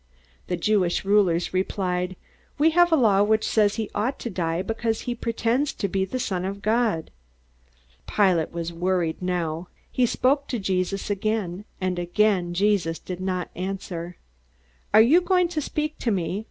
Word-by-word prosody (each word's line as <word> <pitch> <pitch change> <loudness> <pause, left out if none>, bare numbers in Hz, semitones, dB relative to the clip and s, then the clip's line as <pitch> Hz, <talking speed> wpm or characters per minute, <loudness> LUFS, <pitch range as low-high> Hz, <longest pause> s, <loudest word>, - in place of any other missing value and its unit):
The 180 - -1
Jewish 185 -1 +1
rulers 190 -4 +2
replied, 185 -1 -1 0.4
"We 310 +3 +4
have 350 +1 +4
a - - +6
law 215 -8 +4
which 215 +1 +2
says 210 -2 +3
he 220 -2 -3
ought 235 +6 -1
to 235 - -4
die 170 -1 -1
because 225 +1 -2
he 245 - -3
pretends 235 +4 0
to 200 - -2
be 190 0 0
the 225 +7 -4
Son 185 -7 -2
of 200 +1 -5
God." 220 -6 +1 1.0
Pilate 185 -6 +2
was 170 0 -4
worried 175 -1 -1
now. 175 -2 -2 0.2
He 250 -1 +2
spoke 275 +4 +1
to 245 - -2
Jesus 195 0 -1
again, 205 -2 -2
and 185 -2 -1
again 175 -1 +1
Jesus 190 -4 +1
did 180 -1 -7
not 185 -1 -2
answer. 180 -2 -5 0.7
"Aren't 220 +2 +7
you 340 +5 +6
going 360 -1 +2
to 320 -3 -2
speak 305 +1 -3
to 240 - -1
me?" 185 -2 -1
195 Hz, 165 wpm, -24 LUFS, 180-225 Hz, 1.0 s, Aren't